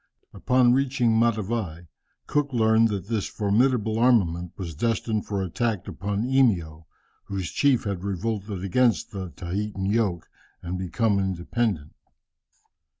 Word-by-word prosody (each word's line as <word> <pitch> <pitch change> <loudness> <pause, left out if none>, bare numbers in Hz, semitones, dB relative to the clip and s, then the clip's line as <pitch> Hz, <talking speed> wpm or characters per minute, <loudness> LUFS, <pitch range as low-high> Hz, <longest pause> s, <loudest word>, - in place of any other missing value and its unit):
"Upon 125 -1 +3
reaching 130 -3 +2
Matavai, 110 -6 0 0.4
Cook 145 -1 0
learned 110 -1 +4
that 100 -2 -4
this 110 -3 -1
formidable 110 +1 +1
armament 90 -9 +2
was 85 -4 -5
destined 110 +4 -1
for 100 -2 -2
an - - -1
attack 115 +1 -2
upon 100 +2 -3
Eimio, 90 -12 +1 0.4
whose 95 -5 -4
chief 140 -4 +2
had 100 -3 -3
revolted 100 0 -3
against 115 +4 +2
the 95 -3 -5
Tahitan 95 +4 -4
yoke, 100 -5 0 0.4
and 90 +1 -4
become 100 +3 +1
independent. 95 -2 -2
105 Hz, 125 wpm, -25 LUFS, 95-115 Hz, 0.4 s, learned